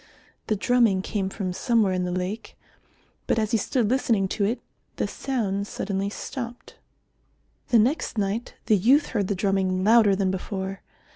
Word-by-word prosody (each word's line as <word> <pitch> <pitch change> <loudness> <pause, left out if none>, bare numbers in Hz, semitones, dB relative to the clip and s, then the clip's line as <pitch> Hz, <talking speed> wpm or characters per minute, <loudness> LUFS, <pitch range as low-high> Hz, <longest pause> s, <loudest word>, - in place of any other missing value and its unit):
The 215 - +1
drumming 215 -3 +2
came 195 -2 -2
from 185 -2 -4
somewhere 220 -1 +2
in 180 0 0
the 180 - -2
lake, 185 +5 -4 0.7
but - - +2
as 215 -1 0
he 230 - +3
stood 235 +1 0
listening 230 -5 +2
to 205 - -1
it, 235 +4 -1 0.4
the - - -1
sound 205 -7 -2
suddenly 195 -1 -2
stopped. 240 +3 -7 0.9
The 240 - +4
next 240 +3 +1
night 205 +3 -2
the 215 - +4
youth 265 - +4
heard 205 -5 -1
the 200 - -1
drumming 190 -1 0
louder 215 -2 +5
than 190 -1 +1
before. 190 0 -4
205 Hz, 160 wpm, -25 LUFS, 190-230 Hz, 0.9 s, louder